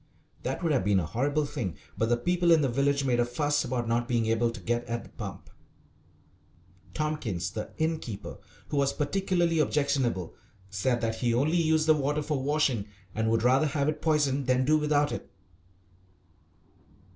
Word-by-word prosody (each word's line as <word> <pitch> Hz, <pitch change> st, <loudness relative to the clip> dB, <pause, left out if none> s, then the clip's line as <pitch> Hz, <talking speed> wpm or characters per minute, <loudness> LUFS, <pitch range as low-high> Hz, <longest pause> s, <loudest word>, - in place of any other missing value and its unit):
That -, -, -3 dB
would 165 Hz, -, +1 dB
have 135 Hz, -8 st, +2 dB
been 100 Hz, 0 st, +3 dB
a 85 Hz, -, -2 dB
horrible 140 Hz, -, 0 dB
thing: 120 Hz, -, -4 dB, 0.2 s
but 115 Hz, -, 0 dB
the 120 Hz, -, +3 dB
people 175 Hz, +7 st, +1 dB
in 165 Hz, -2 st, +6 dB
the -, -, +3 dB
village 140 Hz, +3 st, +1 dB
made 125 Hz, -2 st, +2 dB
a -, -, +5 dB
fuss 145 Hz, +4 st, 0 dB
about 120 Hz, -2 st, -2 dB
not 120 Hz, +1 st, 0 dB
being 120 Hz, -3 st, +1 dB
able 115 Hz, +1 st, +2 dB
to 115 Hz, -1 st, -7 dB
get 120 Hz, +5 st, -1 dB
at 115 Hz, 0 st, -3 dB
the -, -, -15 dB
pump. 95 Hz, -3 st, -8 dB, 1.5 s
Tompkins, 120 Hz, -, -2 dB
the 105 Hz, +2 st, -5 dB
innkeeper, 155 Hz, -10 st, -3 dB, 0.3 s
who 145 Hz, -, -2 dB
was 140 Hz, 0 st, +2 dB
particularly 170 Hz, +1 st, +1 dB
objectionable, 140 Hz, -, 0 dB, 0.4 s
said 120 Hz, +5 st, 0 dB
that 115 Hz, -1 st, -1 dB
he 120 Hz, 0 st, +1 dB
only 150 Hz, +8 st, +2 dB
used 160 Hz, -1 st, +2 dB
the 160 Hz, -, +6 dB
water 145 Hz, +1 st, 0 dB
for 145 Hz, -2 st, -1 dB
washing 135 Hz, -7 st, +1 dB, 0.3 s
and 110 Hz, 0 st, 0 dB
would 115 Hz, 0 st, +1 dB
rather 130 Hz, +5 st, +4 dB
have 140 Hz, 0 st, 0 dB
it 155 Hz, -, -1 dB
poisoned 145 Hz, -4 st, +1 dB
than 130 Hz, 0 st, +3 dB
do 155 Hz, +3 st, +4 dB
without 150 Hz, -1 st, +2 dB
it. -, -, -6 dB
135 Hz, 180 wpm, -28 LUFS, 115-150 Hz, 1.5 s, in